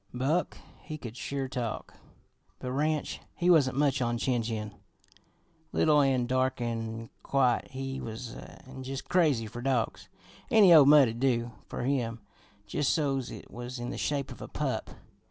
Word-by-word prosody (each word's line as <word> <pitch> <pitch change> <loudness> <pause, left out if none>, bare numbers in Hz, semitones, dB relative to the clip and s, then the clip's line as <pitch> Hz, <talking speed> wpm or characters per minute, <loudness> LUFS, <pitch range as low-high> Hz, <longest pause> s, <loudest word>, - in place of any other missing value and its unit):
"Buck, 145 +8 0 0.2
he 155 - -7
could 120 -5 -8
sure 135 +1 -3
talk, 125 -3 -4 0.6
but 125 - -5
Ranch, 150 +3 -1 0.2
he 180 +1 +3
wasn't 135 -6 +4
much 140 -2 +2
on 120 -1 0
chin 120 0 0
chin. 110 -2 -4 1.0
Little 150 -2 +4
an' 130 -3 +2
dark 130 +1 0
an' 115 -1 -4
quiet 130 -3 +2
he 135 0 -5
was, 115 +1 -6
an' 130 0 -11
jus' 135 +1 -4
crazy 150 -11 +2
fer 115 +3 -7
dogs. 115 -7 -1 0.4
Any 205 -5 +7
old 150 -4 +9
mutt'd 135 -6 +6
do 120 -3 +1 0.2
fer - - -5
him 120 -4 -1 0.5
jus' 140 +7 -1
so's 135 -5 +1
it - - -10
was 120 +1 -6
in 120 0 -4
the - - -5
shape 140 -2 -1
of - - -10
a - - -6
pup. - - -3
130 Hz, 160 wpm, -29 LUFS, 120-140 Hz, 1.0 s, old